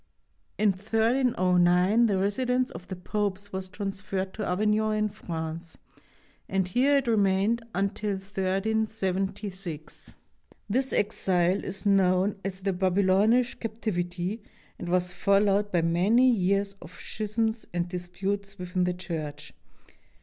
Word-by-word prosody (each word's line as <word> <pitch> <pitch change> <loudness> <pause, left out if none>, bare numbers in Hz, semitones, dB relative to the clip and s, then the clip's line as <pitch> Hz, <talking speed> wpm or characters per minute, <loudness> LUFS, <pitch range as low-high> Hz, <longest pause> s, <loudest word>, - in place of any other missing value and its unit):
In 215 0 +3
1309 205 -2 +3
the 200 -3 +1
residence 250 +6 0
of 170 +2 -10
the 190 - -5
Popes 205 +2 -3
was 190 0 -3
trans 195 -1 -4
ferred 190 -1 -3
to 215 - -4
Avignon 215 +3 +1
in 215 0 +1
France, 165 -2 -6 0.7
and 190 -1 +1
here 265 +9 +3
it 275 - 0
remained 210 +1 +2
until 200 +2 -1
1376. 195 -3 -3 0.5
This 260 +5 0
exile 185 -2 +1
is 195 +2 -5
known 195 0 +3
as 195 -1 -5
the 195 0 0
"Babylonish 195 +6 +2
Captivity" 195 -3 -3 0.4
and 175 - -5
was 180 0 +1
followed 200 +1 +2
by 175 -2 +2
many 200 +10 +4
years 200 -1 +1
of 170 - -11
schisms 220 +1 -2
and 175 0 -1
disputes 190 +3 -4
within 180 0 -1
the 180 0 -1
Church. 150 -4 -6
195 Hz, 120 wpm, -27 LUFS, 180-215 Hz, 0.7 s, many